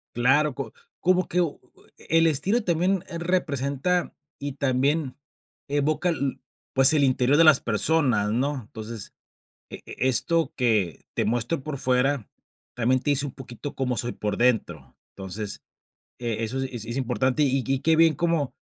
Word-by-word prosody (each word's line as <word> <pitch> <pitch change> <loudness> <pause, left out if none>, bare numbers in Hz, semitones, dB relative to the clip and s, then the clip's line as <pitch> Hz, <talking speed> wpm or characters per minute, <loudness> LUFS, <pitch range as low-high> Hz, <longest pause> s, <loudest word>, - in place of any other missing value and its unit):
Claro 135 +5 +3
co 135 -5 -6 0.3
como 185 0 +2
que, 180 - +1
u 165 -4 -2 0.4
eh, - - -15
el 165 +1 +4
estilo 190 - +1
también 180 +1 +1 0.2
representa 170 -1 -1 0.3
y 140 0 -4
también 140 +1 0 0.5
evoca, 150 +5 +1
lo 140 -4 -2 0.4
pues, 135 0 +6
el 145 - +3
interior 130 +1 +3
de 165 - +7
las 155 -4 +7
personas, 115 -2 +1
¿no? 135 +3 -1
Entonces, 110 0 -8 0.6
e - - -9 0.2
esto 155 +6 +2
que 110 - 0
te - - 0
muestro 120 +6 -1
por 150 -1 -5
fuera 130 -1 +1 0.5
también 125 +2 +1
te 145 - 0
dice 140 +1 +2
un 135 - -6
poquito 130 +2 -8
cómo 125 -2 -1
soy 120 0 -2
por 105 -1 -3
dentro. 95 - 0 0.2
Entonces, 100 +2 -6 0.6
e 115 -2 -2
eso 130 +4 -3
es 120 -4 -5
es 115 +2 -5
importante, 130 +2 +1
y 135 -1 +1
y 135 -1 0
qué 160 +3 +3
bien 165 -2 +5
cómo 165 -4 0
135 Hz, 155 wpm, -25 LUFS, 120-155 Hz, 0.6 s, de